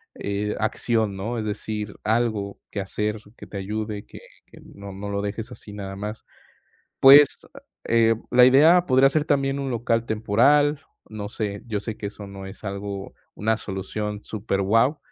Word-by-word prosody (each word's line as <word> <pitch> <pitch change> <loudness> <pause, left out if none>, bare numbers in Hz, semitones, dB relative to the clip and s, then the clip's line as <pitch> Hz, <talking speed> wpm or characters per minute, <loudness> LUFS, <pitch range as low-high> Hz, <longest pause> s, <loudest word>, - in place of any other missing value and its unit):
eh, 100 +1 -3
acción, 110 -1 0
¿no?, 115 +5 -3
es 110 - -3
decir, 105 0 -4
algo 110 -3 0
que 100 - -4
hacer 105 +2 -2 0.2
que - - -10
te 100 - -7
ayude, 105 +1 -4
que - - -12 0.3
que - - -16
no 100 0 -11
no 100 +1 -6
lo 100 0 -2
dejes 110 +4 -5
así 105 -4 -11
nada 95 -1 -6
más. 105 +2 -6 0.8
Pues, 140 +1 +8 0.4
eh, 115 0 +3 0.2
la 125 0 +7
idea 160 +7 +6
podría 130 +1 +5
ser 150 0 +1
también 135 0 +1
un 135 -1 -3
local 115 -1 0
temporal, 140 +8 +3 0.3
no 105 -1 -6
sé, 100 -2 -4
yo 105 -3 -2
sé 110 0 -6
que 100 - -5
eso 100 0 -8
no 100 -1 -9
es 95 - -11
algo 100 0 -5 0.2
una 110 +1 0
solución 105 +1 -5
superguau, 110 +6 +1
105 Hz, 165 wpm, -24 LUFS, 100-120 Hz, 0.8 s, Pues